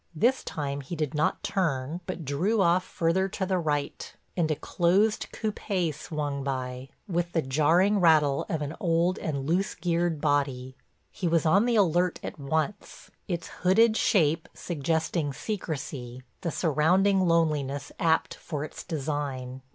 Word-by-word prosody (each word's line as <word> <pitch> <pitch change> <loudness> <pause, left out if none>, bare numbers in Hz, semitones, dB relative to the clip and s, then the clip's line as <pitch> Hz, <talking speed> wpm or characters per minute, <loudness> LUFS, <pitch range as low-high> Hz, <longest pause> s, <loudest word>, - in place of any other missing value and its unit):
This 245 +11 +2
time 140 -2 -3
he 140 +6 -6
did 155 -2 -2
not 150 0 0
turn 165 -5 -1
but 180 -4 -5
drew 180 - +1
off 180 -1 +4
further 185 +1 0
to 190 0 -2
the 185 -1 0
right, 145 -3 -2 0.2
and 165 -3 +1
a 155 - +1
closed 190 +8 +1
coupé 195 -6 -2
swung 145 -2 -4
by, 130 -1 -4 0.2
with 175 -2 -1
the 165 - +2
jarring 165 +9 +3
rattle 155 -5 +4
of 155 -2 -1
an 145 +3 -5
old 170 -1 +1
and 140 -4 -3
loose 180 +6 0
geared 170 -1 0
body. 140 -4 0 0.4
He 180 - -3
was 165 -1 +2
on 195 +8 +4
the 240 -1 +2
alert 180 -3 +2
at - - -6
once, 155 +7 -3 0.2
its 170 -3 -3
hooded 215 +5 +5
shape 165 -8 +2
suggesting 160 -1 -1
secrecy, 135 - -5 0.2
the 170 - -1
surrounding 180 +5 +3
loneliness 145 -4 +1
apt 165 -2 +2
for 150 -4 -5
its 155 - -8
design. 140 -4 -4
160 Hz, 150 wpm, -27 LUFS, 145-180 Hz, 0.4 s, hooded